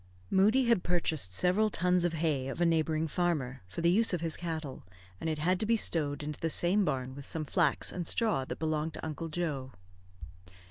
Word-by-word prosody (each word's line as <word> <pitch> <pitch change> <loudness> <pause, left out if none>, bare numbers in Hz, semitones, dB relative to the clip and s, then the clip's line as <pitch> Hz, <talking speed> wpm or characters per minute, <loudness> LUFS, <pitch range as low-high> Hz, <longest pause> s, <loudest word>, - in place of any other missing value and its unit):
Moodie 215 +7 +4
had 235 -5 +3
purchased 160 - 0
several 185 - +3
tons 180 -2 +1
of 175 - 0
hay 155 -5 -1
of 135 - -5
a 175 - +3
neighbouring 160 -1 +1
farmer, 150 -7 -1
for 130 - -6
the 170 +1 +4
use 215 0 +4
of 170 - -5
his 165 -2 +1
cattle, 160 -5 -5 0.4
and 160 - -2
it 155 - -1
had 180 +4 +1
to - - 0
be 230 - +4
stowed 150 -8 0
into 150 0 -5
the 165 - -1
same 180 +6 +2
barn 130 -5 -2
with 140 +1 -9
some 160 -1 -4
flax - - +1
and 175 -2 -4
straw 220 - +2
that - - -6
belonged 155 0 -2
to - - -6
Uncle 160 +1 -4
Joe. 150 -6 -3
165 Hz, 205 wpm, -31 LUFS, 150-180 Hz, 0.4 s, Moodie